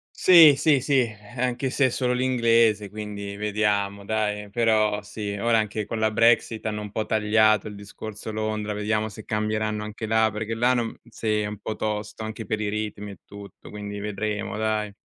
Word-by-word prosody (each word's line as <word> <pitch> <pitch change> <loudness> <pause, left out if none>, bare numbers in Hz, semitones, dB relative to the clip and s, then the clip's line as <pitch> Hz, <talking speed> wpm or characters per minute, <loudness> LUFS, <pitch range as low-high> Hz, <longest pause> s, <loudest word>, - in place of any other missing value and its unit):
Sì, 165 -6 +8
sì, 145 -3 +3
sì, 135 -3 +2 0.3
anche 125 +1 -1
se 140 +1 +2
è - - +3
solo 125 0 0
l'inglese, 115 -5 +2
quindi 105 -1 -6
vediamo 100 -1 -1
dai. 105 -1 -2
Però 110 -2 +2
sì, 105 0 -5
ora 115 +1 +2
anche 110 0 -2
con 115 - -4
la 110 0 +2
Brexit 115 0 +2
hanno 105 -1 -2
un 105 -1 -7
po' 110 - -2
tagliato 110 -1 +3
il 105 - -8
discorso 105 +1 -8
Londra, 110 -1 -2
vediamo 110 +1 -1
se 110 +1 -11
cambieranno 110 0 -1
anche 105 +1 -6
là, 110 -1 +3
perché 110 +2 -4
là 125 +2 +3
non 120 -2 -2
sì, 110 -2 -1
è - - -2
un 105 0 -6
po' 110 - -4
tosto 105 0 -4
anche 110 0 -6
per 110 - -1
i 105 - -1
ritmi 105 -1 -4
e 100 - -13
tutto, 100 0 -12
quindi 105 -1 -6
vedremo 105 0 -3
dai. 110 -1 -1
110 Hz, 185 wpm, -25 LUFS, 105-110 Hz, 0.3 s, Sì